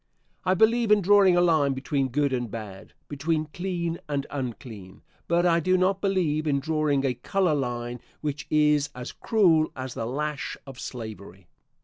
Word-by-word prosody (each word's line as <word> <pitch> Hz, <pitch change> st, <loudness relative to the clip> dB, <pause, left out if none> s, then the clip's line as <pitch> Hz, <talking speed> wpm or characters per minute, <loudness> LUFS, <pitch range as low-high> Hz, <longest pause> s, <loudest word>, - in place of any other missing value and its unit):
I 185 Hz, 0 st, +3 dB
believe 225 Hz, +2 st, +3 dB
in 210 Hz, -2 st, +5 dB
drawing 195 Hz, -1 st, +5 dB
a -, -, +5 dB
line 155 Hz, -5 st, +3 dB
between 135 Hz, +1 st, -1 dB
good 140 Hz, +2 st, 0 dB
and 120 Hz, -2 st, -2 dB
bad, 105 Hz, -3 st, -8 dB
between 155 Hz, +2 st, -2 dB
clean 175 Hz, -2 st, -3 dB
and 140 Hz, -1 st, -1 dB
unclean, 120 Hz, -8 st, -7 dB, 0.2 s
but 170 Hz, +1 st, +2 dB
I 170 Hz, -1 st, +4 dB
do 185 Hz, +3 st, +2 dB
not 190 Hz, +1 st, +1 dB
believe 165 Hz, -6 st, 0 dB
in 140 Hz, -2 st, +2 dB
drawing 150 Hz, -2 st, 0 dB
a 130 Hz, -, +1 dB
color 185 Hz, +6 st, 0 dB
line 120 Hz, -3 st, -3 dB, 0.2 s
which 145 Hz, -2 st, -4 dB
is 150 Hz, -1 st, +3 dB
as 125 Hz, 0 st, -6 dB
cruel 170 Hz, -8 st, +2 dB
as 130 Hz, -2 st, -5 dB
the 115 Hz, -, -4 dB
lash 150 Hz, +3 st, -3 dB
of 135 Hz, -2 st, -10 dB
slavery. 100 Hz, -6 st, -8 dB
150 Hz, 165 wpm, -26 LUFS, 130-175 Hz, 0.2 s, in